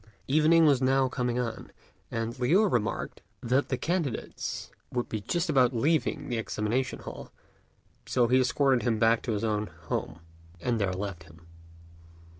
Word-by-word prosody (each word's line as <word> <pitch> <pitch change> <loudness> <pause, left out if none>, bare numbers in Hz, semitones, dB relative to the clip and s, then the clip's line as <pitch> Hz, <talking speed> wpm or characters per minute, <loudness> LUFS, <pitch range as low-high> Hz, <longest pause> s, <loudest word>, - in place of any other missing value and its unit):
Evening 155 +3 +5
was 140 -4 +4
now 135 0 +3
coming 125 -1 -2
on, 120 -2 -4 0.4
and 115 +2 -3
Liu 170 +13 +4
remarked 120 - -1 0.2
that 130 +4 +1
the 130 - 0
candidates 160 -2 -3 0.2
would 125 -1 -2
be 110 - -4
just 175 - -1
about 130 -5 +3
leaving 150 +2 +1
the 120 -3 -1
examination 115 +4 -1
hall; - - -9 0.8
so 125 -2 +2
he 130 +2 +4
escorted 130 0 +2
him 115 -3 +1
back 115 +1 +3
to 115 - -2
his 105 - -2
own 105 -1 0
home, 80 -1 -5 0.4
and 115 +4 -1
there 95 -2 +1
left 90 -2 -5
him. 80 0 -17
125 Hz, 155 wpm, -28 LUFS, 110-135 Hz, 0.8 s, Evening